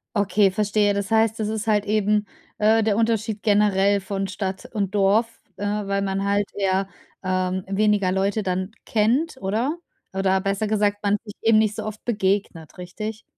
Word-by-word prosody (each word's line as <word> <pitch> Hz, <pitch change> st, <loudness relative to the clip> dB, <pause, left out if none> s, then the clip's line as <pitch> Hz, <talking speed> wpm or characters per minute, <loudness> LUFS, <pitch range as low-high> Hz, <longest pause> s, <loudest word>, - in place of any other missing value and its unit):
Okay, 205 Hz, 0 st, +3 dB
verstehe. 205 Hz, 0 st, +1 dB
Das 200 Hz, +1 st, -3 dB
heißt, 225 Hz, 0 st, +2 dB
das 215 Hz, 0 st, -1 dB
ist 220 Hz, 0 st, -3 dB
halt 210 Hz, -1 st, +2 dB
eben, 210 Hz, 0 st, +1 dB, 0.3 s
äh, 220 Hz, +1 st, +4 dB
der 210 Hz, -1 st, +1 dB
Unterschied 225 Hz, -2 st, 0 dB
generell 200 Hz, -1 st, +3 dB
von 195 Hz, 0 st, -3 dB
Stadt 190 Hz, 0 st, -4 dB
und 200 Hz, -1 st, -2 dB
Dorf, 210 Hz, +4 st, +2 dB, 0.2 s
äh, 205 Hz, -, -6 dB
weil 200 Hz, -1 st, -1 dB
man 195 Hz, 0 st, -1 dB
halt 205 Hz, 0 st, +1 dB
eher, 195 Hz, -1 st, 0 dB, 0.4 s
ähm, 185 Hz, 0 st, -1 dB
weniger 200 Hz, -1 st, +2 dB
Leute 195 Hz, +3 st, 0 dB
dann 185 Hz, +2 st, -2 dB
kennt, 245 Hz, +8 st, +1 dB
oder? 230 Hz, -, -1 dB, 0.4 s
Oder 190 Hz, 0 st, +1 dB
besser 195 Hz, +2 st, -1 dB
gesagt, 205 Hz, -1 st, 0 dB
man 205 Hz, +1 st, +2 dB
sich 210 Hz, -2 st, -9 dB
eben 225 Hz, -1 st, +5 dB
nicht 215 Hz, -1 st, +1 dB
so -, -, -4 dB
oft 215 Hz, 0 st, -7 dB
begegnet, 195 Hz, -7 st, -1 dB
richtig? 215 Hz, +5 st, -6 dB
205 Hz, 170 wpm, -23 LUFS, 195-215 Hz, 0.4 s, eben